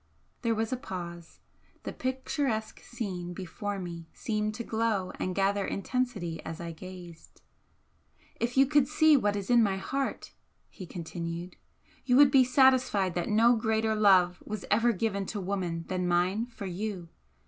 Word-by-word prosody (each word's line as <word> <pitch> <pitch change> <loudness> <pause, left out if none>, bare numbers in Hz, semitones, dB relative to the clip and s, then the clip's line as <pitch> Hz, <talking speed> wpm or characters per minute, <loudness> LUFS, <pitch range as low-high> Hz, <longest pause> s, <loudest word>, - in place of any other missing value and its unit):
There 230 -2 +1
was 225 +2 -1
a - - -1
pause. 175 -6 -8 0.4
The - - -5
picturesque 260 -3 -2
scene 185 -7 -5
before 200 +3 -5
me 170 -3 -7
seemed 215 -1 -2
to 235 - -4
glow 220 -5 -1
and 185 -1 -2
gather 200 +1 +1
intensity 200 -7 -2
as 160 0 -6
I 170 -1 -5
gazed. 175 0 -12 1.0
"If 235 +2 -2
you 270 - +7
could 290 -1 +3
see 310 +1 +5
what 205 -6 +2
is 200 +2 -3
in 240 -1 +6
my 195 -3 +2
heart," 270 +8 -3 0.4
he 185 - -9
continued 170 +1 -6 0.5
"you 250 - +2
would 280 0 +7
be 265 -1 +7
satisfied 250 -7 +3
that 175 0 -2
no 230 +3 +5
greater 220 0 +1
love 190 -4 +4
was 215 -2 -6
ever 230 +3 +4
given 200 -2 -2
to 210 - -4
woman 180 -4 -3
than 180 -1 -1
mine 180 +6 +1
for 230 -4 -9
you! 185 -1 -4
205 Hz, 160 wpm, -29 LUFS, 180-235 Hz, 1.0 s, you